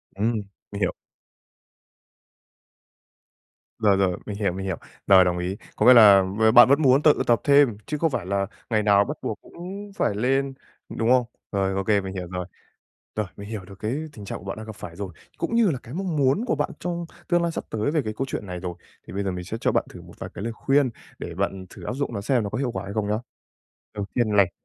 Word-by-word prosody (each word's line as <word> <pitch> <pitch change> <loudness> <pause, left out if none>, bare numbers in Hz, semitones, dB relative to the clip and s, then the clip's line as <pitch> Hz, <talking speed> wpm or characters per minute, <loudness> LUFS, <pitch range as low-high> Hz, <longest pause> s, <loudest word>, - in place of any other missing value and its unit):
Ừm, 110 +4 +1 0.4
mình 100 - -5
hiểu. - - +1 2.9
Rồi, 100 -3 +4
rồi, 95 -2 +1
mình 105 - -5
hiểu, 100 -3 0
mình 95 +1 -5
hiểu. 95 -3 -2 0.3
Rồi, 95 -2 +8
đồng 90 -1 0
ý. 90 +3 -3 0.2
Có 105 - +1
nghĩa 125 - +10
là 100 -5 +8
b 110 +4 +2
bạn 120 +1 +10
vẫn 140 +3 +4
muốn 135 0 +5
tự 150 - +5
tập 120 -3 +4
thêm 140 -6 +5
chứ 150 - -3
không 165 +1 +2
phải 90 - -2
là 100 +1 0 0.2
ngày 110 -2 +2
nào 100 -1 +5
bắt - - -5
buộc - - -4
cũng 195 +4 -9
phải 105 - 0
lên, 135 +5 +1 0.4
đúng 115 +1 -1
không? 125 -1 +5 0.3
Rồi, 95 -1 0
ô 95 - -1
kê, 105 0 +2
mình 95 0 -6
hiểu 90 -2 -5
rồi. 90 0 -3 0.7
Rồi, 110 - 0
mình 100 0 -9
hiểu 110 -4 -5
được 95 0 -13
cái 110 +3 -2 0.2
tình 105 -7 -10
trạng - - -5
của - - -14
bạn 95 +1 -4
đang 110 0 -8
gặp 110 - -7
phải 85 -4 -9
rồi, 95 -2 -5 0.3
cũng 230 - -2
như 230 -5 +4
là 135 - -2
cái 120 - -10
mong 180 -3 -2
muốn 140 - +2
của - - +1
bạn 145 - -1
trong 170 -1 -3 0.2
tương 175 -1 +3
lai 170 - 0
sắp - - -4
tới 110 +5 0
về 155 -1 +1
cái 110 -3 -3
câu 135 - -1
chuyện 105 - -4
này 90 -1 -5
rồi, 90 -2 -4 0.3
thì - - -9
bây 100 +1 -2
giờ 95 - 0
mình 90 -1 -5
sẽ 110 +5 -5
cho - - +2
bạn - - +2
thử - - -11
một - - -14
vài - - -6
cái 100 - -5
lời 115 - -2
khuyên 135 +3 +2 0.3
để 85 - -6
bạn 95 0 -2
thử - - -12
áp - - -3
dụng 135 -2 -3
nó 100 - -2
xem 120 +3 +1
nó 100 - -3
có - - -3
hiệu 130 -2 0
quả 95 +1 -4
hay 100 - -6
không 105 -1 -1
nhá. 105 - +1 0.8
Đầu 105 -1 -3
tiên 120 -3 +1
này 95 -3 +5
110 Hz, 250 wpm, -24 LUFS, 95-135 Hz, 2.9 s, nghĩa